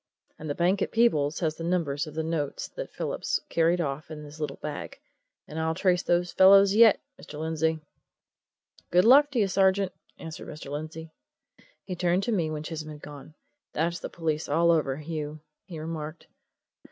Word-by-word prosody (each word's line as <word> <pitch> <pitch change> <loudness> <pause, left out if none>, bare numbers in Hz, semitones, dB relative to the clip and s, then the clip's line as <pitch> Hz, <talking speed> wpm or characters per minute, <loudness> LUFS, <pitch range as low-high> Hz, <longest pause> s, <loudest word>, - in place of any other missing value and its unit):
And 155 - -6
the 145 - -1
bank 180 +3 +2
at - - -1
Peebles 155 -11 +2
has 155 -2 -1
the 165 - -6
numbers 165 -4 -1
of 155 - -10
the 160 - -1
notes 155 -3 -2
that - - -7
Phillips - - -2
carried 170 +2 +2
off 150 -1 -3
in 155 -1 -8
his 150 +1 -11
little 150 - -3
bag 150 -1 -7 0.5
and 155 - -6
I'll 160 0 0
trace 180 -2 +2
those 175 0 +1
fellows 195 +1 +7
yet, 220 -1 +7 0.2
Mr. - - -10
Lindsey." 160 0 0 1.1
"Good 180 +3 +4
luck 285 +5 +7
to 270 -4 -1
you, 205 - +3
sergeant!" 190 0 +2 0.3
answered 160 -1 -8
Mr. 150 -2 -8
Lindsey. 155 +2 -6 0.7
He 185 - -5
turned 180 +2 +1
to 240 - -1
me 170 -7 +1
when 155 -1 -4
Chisholm 155 -1 -6
had 150 -1 -10
gone. 145 +1 -11 0.4
"That's 170 +3 -1
the - - -6
police 160 -2 -2
all 170 +3 +4
over, 145 -5 +1
Hugh," 155 -1 -5 0.3
he 170 - -8
remarked. 155 0 -6
160 Hz, 180 wpm, -27 LUFS, 155-180 Hz, 1.1 s, fellows